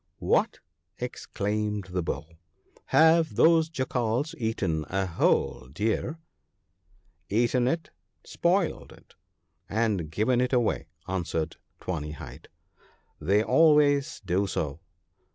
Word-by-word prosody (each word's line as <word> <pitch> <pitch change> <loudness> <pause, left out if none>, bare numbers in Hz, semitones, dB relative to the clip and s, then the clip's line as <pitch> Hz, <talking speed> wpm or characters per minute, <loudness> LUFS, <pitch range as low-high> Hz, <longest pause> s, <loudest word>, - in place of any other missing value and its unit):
* - - -48 0.2
What! - - +2 0.2
' - - -50
exclaimed 105 -1 -3
the 90 0 -1
Bull, 85 -1 -5 0.3
' - - -47 0.2
have 160 0 +4
those 160 -1 +5
Jackals 130 -1 -1
eaten 95 -9 -1
a 95 0 0
whole 70 -7 0
deer? 110 - -1 0.6
' 85 -3 -40
'Eaten 120 +3 +2
it, 165 +5 -2 0.3
spoiled 175 0 0
it, - - -18 0.6
and 105 -7 0
given 110 +9 +1
it 125 +1 0
away,' 120 -3 +1 0.2
answered 85 -3 -2 0.2
Tawny 75 -4 -4
hide; - - -10 0.4
' - - -31 0.3
they 100 +7 +3
always 150 -2 +3
do 95 +2 +1
so.' 75 -4 -3
110 Hz, 120 wpm, -27 LUFS, 90-140 Hz, 0.6 s, those